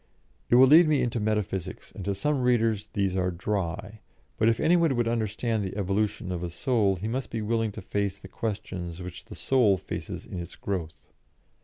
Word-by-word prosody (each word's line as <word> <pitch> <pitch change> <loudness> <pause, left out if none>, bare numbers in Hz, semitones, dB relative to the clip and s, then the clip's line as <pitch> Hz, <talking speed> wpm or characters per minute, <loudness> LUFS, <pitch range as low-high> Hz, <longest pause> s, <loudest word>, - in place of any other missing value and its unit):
It - - +5
will 130 +2 +9
lead 155 +5 +7
me 150 -2 +3
into 120 -1 -1
metaphysics, 100 -4 -2
and 100 - -8
to 100 -1 0
some 145 +6 0
readers 115 -4 +2
these 95 -2 0
are 90 -1 +1
dry, 100 +3 -3 0.4
but 110 - +5
if 115 - +1
any 170 +3 +4
one 165 -6 +3
would 120 -1 +1
understand 110 -1 -1
the 95 +1 -5
evolution 100 0 -1
of 90 -2 -3
a 90 - -3
Soul 100 +1 +1
he 95 +4 -4
must 130 +3 -2
be 115 -2 -3
willing 115 0 0
to - - -8
face 100 0 -1
the 95 - -12
questions 95 -5 -4
which 90 -1 -8
the - - -10
Soul 120 -8 +3
faces - - -6
in 90 - -6
its 85 - -7
growth. 85 -7 -5
105 Hz, 200 wpm, -27 LUFS, 95-115 Hz, 0.4 s, will